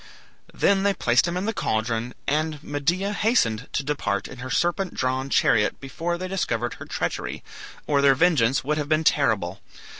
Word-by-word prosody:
Then 195 Hz, -1 st, +2 dB
they 200 Hz, 0 st, +2 dB
placed 125 Hz, 0 st, +3 dB
him 170 Hz, +1 st, -2 dB
in 185 Hz, -, -2 dB
the 225 Hz, -, -1 dB
caldron, 115 Hz, -, -2 dB
and 155 Hz, 0 st, -1 dB
Medea 170 Hz, +8 st, -1 dB
hastened 135 Hz, -, +1 dB
to 140 Hz, -, 0 dB
depart 135 Hz, -9 st, -2 dB
in 125 Hz, -, -11 dB
her 130 Hz, +1 st, -6 dB
serpent 175 Hz, +6 st, 0 dB
drawn 130 Hz, +1 st, -1 dB
chariot 105 Hz, -5 st, +2 dB
before 165 Hz, +6 st, -3 dB
they 185 Hz, +1 st, -4 dB
discovered 120 Hz, -11 st, -2 dB
her -, -, -6 dB
treachery, -, -, -3 dB, 0.4 s
or 140 Hz, -2 st, +2 dB
their 140 Hz, -1 st, +5 dB
vengeance 135 Hz, -5 st, +3 dB
would 150 Hz, +3 st, -1 dB
have 145 Hz, -1 st, -3 dB
been 155 Hz, 0 st, +2 dB
terrible. 100 Hz, -, +1 dB
145 Hz, 175 wpm, -24 LUFS, 125-175 Hz, 0.4 s, their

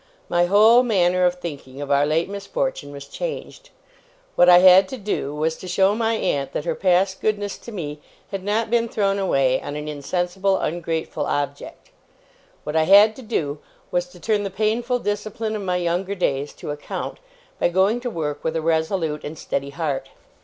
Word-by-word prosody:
My 175 Hz, 0 st, +3 dB
whole 215 Hz, +5 st, +6 dB
manner 185 Hz, -6 st, +2 dB
of 180 Hz, -, -1 dB
thinking 145 Hz, -6 st, -8 dB
of 145 Hz, 0 st, -4 dB
our 140 Hz, +1 st, +3 dB
late 160 Hz, +2 st, +1 dB
misfortune 200 Hz, -, -3 dB
was 140 Hz, -1 st, -9 dB
changed. -, -, -6 dB, 0.7 s
What 175 Hz, -, +6 dB
I 175 Hz, -, +9 dB
had 185 Hz, +1 st, +7 dB
to 260 Hz, -, -5 dB
do, 195 Hz, -, -3 dB
was, 160 Hz, +2 st, 0 dB
to 185 Hz, -, -9 dB
show 190 Hz, +2 st, +3 dB
my 225 Hz, +1 st, 0 dB
aunt 140 Hz, -9 st, -1 dB
that -, -, -3 dB
her -, -, 0 dB
past 190 Hz, +1 st, +1 dB
goodness 205 Hz, -2 st, -1 dB
to 235 Hz, -, -10 dB
me 150 Hz, -8 st, -5 dB, 0.3 s
had 195 Hz, -2 st, -4 dB
not 215 Hz, +3 st, -1 dB
been 235 Hz, -1 st, +2 dB
thrown 200 Hz, -2 st, 0 dB
away 135 Hz, -9 st, +2 dB
on 145 Hz, -, -6 dB
an 150 Hz, 0 st, -5 dB
insensible, 180 Hz, +6 st, -1 dB
ungrateful 160 Hz, -3 st, -3 dB
object. 145 Hz, 0 st, -4 dB, 0.7 s
What 150 Hz, -, -5 dB
I 160 Hz, 0 st, +3 dB
had 205 Hz, +4 st, +7 dB
to -, -, -9 dB
do, 155 Hz, -, -2 dB, 0.3 s
was, 175 Hz, 0 st, 0 dB
to 180 Hz, 0 st, -16 dB
turn 210 Hz, +4 st, 0 dB
the 200 Hz, -, -3 dB
painful 225 Hz, +5 st, 0 dB
discipline 215 Hz, +1 st, -3 dB
of 210 Hz, -, -4 dB
my 180 Hz, -2 st, -1 dB
younger 180 Hz, +3 st, -1 dB
days 145 Hz, -6 st, -1 dB
to -, -, -7 dB
account, 145 Hz, 0 st, -6 dB, 0.4 s
by -, -, +2 dB
going 190 Hz, +6 st, +2 dB
to 245 Hz, 0 st, -4 dB
work 150 Hz, -8 st, -4 dB
with 160 Hz, -, -1 dB
a -, -, +1 dB
resolute 160 Hz, -1 st, 0 dB
and 155 Hz, +2 st, -7 dB
steady 140 Hz, -2 st, -3 dB
heart. 145 Hz, -2 st, -3 dB
180 Hz, 190 wpm, -22 LUFS, 150-205 Hz, 0.7 s, I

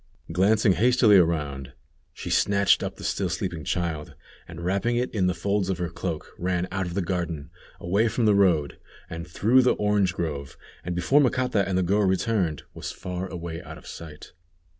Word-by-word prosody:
Glancing 100 Hz, +4 st, +3 dB
hastily 115 Hz, +2 st, +5 dB
around, 75 Hz, -6 st, 0 dB, 0.4 s
she -, -, -7 dB
snatched 100 Hz, -1 st, +3 dB
up -, -, -4 dB
the -, -, -11 dB
still -, -, -1 dB
sleeping 85 Hz, -4 st, -3 dB
child, 80 Hz, -4 st, -3 dB, 0.3 s
and 85 Hz, 0 st, -8 dB
wrapping 100 Hz, +6 st, 0 dB
it 125 Hz, +1 st, -1 dB
in 95 Hz, -5 st, +1 dB
the 90 Hz, -, +1 dB
folds 100 Hz, +2 st, -1 dB
of 95 Hz, -, 0 dB
her 85 Hz, -1 st, -2 dB
cloak, 85 Hz, -3 st, -5 dB
ran 90 Hz, 0 st, -1 dB
out 95 Hz, 0 st, -2 dB
of 85 Hz, -, -6 dB
the 100 Hz, -, 0 dB
garden, 85 Hz, -5 st, -3 dB, 0.3 s
away 100 Hz, +6 st, +1 dB
from 115 Hz, +1 st, 0 dB
the 105 Hz, -, +5 dB
road, 90 Hz, -7 st, +2 dB, 0.3 s
on 85 Hz, +1 st, -5 dB
through 110 Hz, +10 st, +3 dB
the 125 Hz, -, +3 dB
orange 105 Hz, -3 st, +1 dB
grove, 70 Hz, -5 st, -4 dB, 0.3 s
and 90 Hz, 0 st, -3 dB
before 110 Hz, +12 st, +3 dB
Macata 125 Hz, -6 st, +1 dB
and 95 Hz, -, 0 dB
the 95 Hz, -, +2 dB
girl 100 Hz, +4 st, +2 dB
returned, 95 Hz, -4 st, 0 dB
was -, -, -6 dB
far 90 Hz, 0 st, -5 dB
away 85 Hz, -3 st, -6 dB
out -, -, -10 dB
of -, -, -15 dB
sight. 80 Hz, -2 st, -10 dB
90 Hz, 185 wpm, -25 LUFS, 85-100 Hz, 0.4 s, hastily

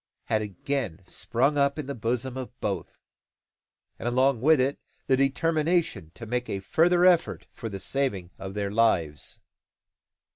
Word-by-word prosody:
had 110 Hz, -, 0 dB
again 105 Hz, -, -3 dB
sprung 130 Hz, +10 st, 0 dB
up 140 Hz, +1 st, +2 dB
in 155 Hz, -, -4 dB
the 140 Hz, -, -4 dB
bosom 125 Hz, +2 st, -2 dB
of 130 Hz, -1 st, -7 dB
both; 100 Hz, -2 st, -4 dB, 1.0 s
and, -, -, -4 dB
along 130 Hz, 0 st, +2 dB
with 155 Hz, +2 st, +5 dB
it 135 Hz, +2 st, +1 dB, 0.3 s
the 135 Hz, -, +3 dB
determination 155 Hz, -, +1 dB
to 115 Hz, -, -8 dB
make 125 Hz, +2 st, -2 dB
a 100 Hz, -, -2 dB
further 175 Hz, -, +3 dB
effort 175 Hz, -2 st, +3 dB
for 115 Hz, -, -6 dB
the 100 Hz, -2 st, -6 dB
saving 100 Hz, -7 st, -2 dB
of 95 Hz, 0 st, -7 dB
their 100 Hz, -1 st, -2 dB
lives. 90 Hz, -10 st, +1 dB
125 Hz, 150 wpm, -27 LUFS, 105-140 Hz, 1.0 s, with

